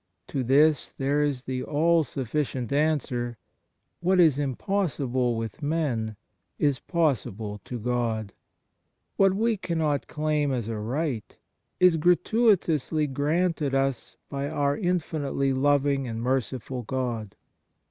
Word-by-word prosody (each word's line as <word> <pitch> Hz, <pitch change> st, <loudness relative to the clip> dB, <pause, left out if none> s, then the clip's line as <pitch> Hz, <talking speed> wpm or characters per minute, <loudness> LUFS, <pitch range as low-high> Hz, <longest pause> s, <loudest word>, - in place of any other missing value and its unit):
To 135 Hz, -, -1 dB
this 145 Hz, +3 st, +4 dB
there 140 Hz, +2 st, 0 dB
is 140 Hz, -3 st, -1 dB
the 130 Hz, -1 st, -3 dB
all 165 Hz, +4 st, +2 dB
sufficient 130 Hz, -1 st, -3 dB
answer: 130 Hz, -6 st, 0 dB, 0.6 s
What 185 Hz, +2 st, +2 dB
is 155 Hz, -5 st, +5 dB
impossible 135 Hz, -, 0 dB
with 115 Hz, +4 st, -5 dB
men 140 Hz, -8 st, -1 dB, 0.4 s
is 145 Hz, -3 st, +1 dB
possible 110 Hz, -, -1 dB
to 125 Hz, -, -5 dB
God; 115 Hz, -3 st, -1 dB, 0.8 s
what 195 Hz, -1 st, +4 dB
we 225 Hz, +1 st, +1 dB
cannot 160 Hz, -6 st, -1 dB
claim 150 Hz, -2 st, 0 dB
as 120 Hz, -4 st, -2 dB
a 115 Hz, -2 st, -3 dB
right 125 Hz, +1 st, -3 dB, 0.4 s
is 180 Hz, -2 st, +5 dB
gratuitously 175 Hz, -, +2 dB
granted 150 Hz, 0 st, 0 dB
us 135 Hz, -2 st, -1 dB
by 140 Hz, 0 st, -3 dB
our 140 Hz, 0 st, +1 dB
infinitely 155 Hz, -7 st, -1 dB
loving 140 Hz, 0 st, +2 dB
and 115 Hz, -1 st, -4 dB
merciful 130 Hz, 0 st, -2 dB
God. 120 Hz, -4 st, -3 dB
140 Hz, 115 wpm, -26 LUFS, 125-160 Hz, 0.8 s, is